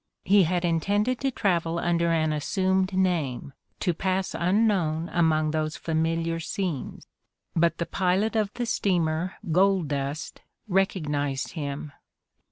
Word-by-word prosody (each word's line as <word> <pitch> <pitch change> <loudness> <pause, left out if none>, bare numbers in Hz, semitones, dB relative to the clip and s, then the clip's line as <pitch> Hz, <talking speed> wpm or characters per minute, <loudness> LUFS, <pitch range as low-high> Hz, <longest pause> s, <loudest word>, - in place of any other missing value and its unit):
He 195 0 +5
had 175 +1 0
intended 205 +9 +1
to 270 - 0
travel 170 -8 0
under 170 0 +1
an 155 -2 +1
assumed 190 +5 +1
name, 170 -9 -1 0.3
to 180 - +1
pass 190 +2 -1
unknown 175 -4 +1
among 155 -3 +2
those 155 0 -2
familiar 165 +1 -1
scenes, 165 -3 -4 0.5
but 170 0 +2
the 170 - -1
pilot 190 +6 0
of 210 -2 +1
the 245 - -2
steamer 180 -6 0 0.2
Gold 185 -2 +3
Dust 140 +2 -4 0.3
recognizedi 150 -8 0
him. 145 -2 -5
170 Hz, 125 wpm, -26 LUFS, 155-190 Hz, 0.5 s, He